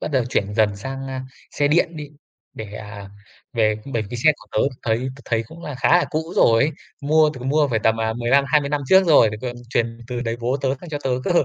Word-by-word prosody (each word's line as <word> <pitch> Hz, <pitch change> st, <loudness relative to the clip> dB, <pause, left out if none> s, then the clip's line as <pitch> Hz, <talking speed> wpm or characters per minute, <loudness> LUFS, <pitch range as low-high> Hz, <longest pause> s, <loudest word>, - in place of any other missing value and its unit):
bắt -, -, -3 dB
đầu 130 Hz, -3 st, +2 dB
chuyển 105 Hz, -4 st, -1 dB
dần 105 Hz, -2 st, +2 dB
sang, 135 Hz, +5 st, -6 dB
a, 130 Hz, -1 st, -4 dB, 0.3 s
xe 145 Hz, -1 st, +1 dB
điện 170 Hz, +2 st, +2 dB
đi, 150 Hz, -1 st, -7 dB, 0.4 s
để, 110 Hz, -2 st, -8 dB
à, 100 Hz, -2 st, -9 dB, 0.4 s
về 110 Hz, -3 st, +2 dB, 0.2 s
bởi 115 Hz, -, 0 dB
vì 120 Hz, -, -4 dB
xe 155 Hz, +6 st, +4 dB
của -, -, -18 dB
tớ -, -, 0 dB, 0.2 s
thấy 110 Hz, 0 st, +1 dB, 0.2 s
tớ -, -, -14 dB
thấy 115 Hz, -1 st, 0 dB
cũng 170 Hz, +7 st, -13 dB
là 150 Hz, -, -6 dB
khá 135 Hz, -, 0 dB
là -, -, +1 dB
cũ 160 Hz, +1 st, -3 dB
rồi. 115 Hz, +6 st, +4 dB, 0.3 s
Mua 155 Hz, +1 st, +4 dB
từng 130 Hz, 0 st, -5 dB
mua 150 Hz, 0 st, +3 dB
phải 115 Hz, -, +1 dB
tầm, 110 Hz, +1 st, +1 dB
à, 110 Hz, 0 st, 0 dB
15-20 140 Hz, +4 st, +2 dB
năm 145 Hz, 0 st, 0 dB
trước 190 Hz, 0 st, +6 dB
rồi, 145 Hz, -8 st, +6 dB
để 110 Hz, -, -6 dB
còn 120 Hz, -1 st, -4 dB
truyền 115 Hz, -1 st, -1 dB
từ 125 Hz, -1 st, -4 dB
đời 115 Hz, -1 st, -2 dB
bố 125 Hz, +3 st, 0 dB
tớ 135 Hz, -, 0 dB
sang 175 Hz, -, -10 dB
cho 150 Hz, -2 st, -3 dB
tớ 130 Hz, -, 0 dB
cơ. 190 Hz, -, -1 dB
125 Hz, 245 wpm, -21 LUFS, 115-145 Hz, 0.4 s, trước